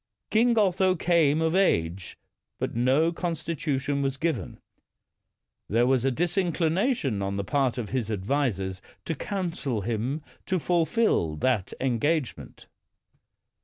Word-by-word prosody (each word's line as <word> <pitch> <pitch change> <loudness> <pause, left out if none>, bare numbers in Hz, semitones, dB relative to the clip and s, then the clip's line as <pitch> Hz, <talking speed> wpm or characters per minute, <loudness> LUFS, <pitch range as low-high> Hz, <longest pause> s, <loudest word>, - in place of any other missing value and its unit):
King 230 +1 +3
Otho 190 -2 +3
came 160 -3 +2
of 160 0 +1
age, 90 - +1 0.4
but - - -3
no 130 +8 +3
constitution 150 -5 -2
was 135 -1 -1
given. 160 +3 -2 1.1
There 115 +4 +3
was 130 -1 +2
a 135 - +3
disinclination 175 - 0
on 100 0 -2
the 100 - -1
part 130 +4 0
of 115 -5 -4
his 120 -4 -2
advisers 100 -3 -1 0.2
to 165 - -1
counsel 165 - -3
him 120 +8 -2 0.2
to 185 - +1
fulfil 170 - +1
that 100 +3 0
engagement. 135 +3 -1
140 Hz, 120 wpm, -26 LUFS, 115-170 Hz, 1.1 s, King